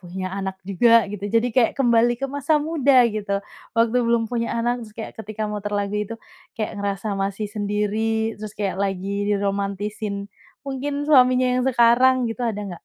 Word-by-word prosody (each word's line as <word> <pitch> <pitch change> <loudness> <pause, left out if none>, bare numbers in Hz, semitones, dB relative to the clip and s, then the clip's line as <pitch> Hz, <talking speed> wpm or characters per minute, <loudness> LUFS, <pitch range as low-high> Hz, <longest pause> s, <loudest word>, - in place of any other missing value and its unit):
punya 185 +1 -6
anak 190 -1 -4
juga 230 +4 +4
gitu, 205 -1 -5
jadi 230 +3 +2
kayak 240 -2 +3
kembali 240 -2 +3
ke 275 - -4
masa 285 +2 0
muda 285 -4 +4
gitu, 200 -2 -2 0.3
waktu 230 +1 +3
belum 235 -1 +2
punya 235 -1 -1
anak. 240 +1 0
Terus 220 -2 -10
kayak 220 - -6
ketika 215 0 -6
muter 205 0 -4
lagu 200 0 -2
itu, 210 +2 -3 0.4
kayak 215 - -3
ngerasa 200 +1 -2
masih 195 +2 -2
sendiri, 215 +2 -1
terus 215 -1 -7
kayak 195 -2 -2
lagi 200 +1 -2
diromantisin, 200 0 -2 0.3
mungkin 280 +1 -3
suaminya 255 -3 +5
yang - - 0
sekarang 250 +1 +4
gitu. 225 - -7
Ada 210 -2 -3
nggak? - - -17
220 Hz, 170 wpm, -22 LUFS, 200-240 Hz, 0.4 s, suaminya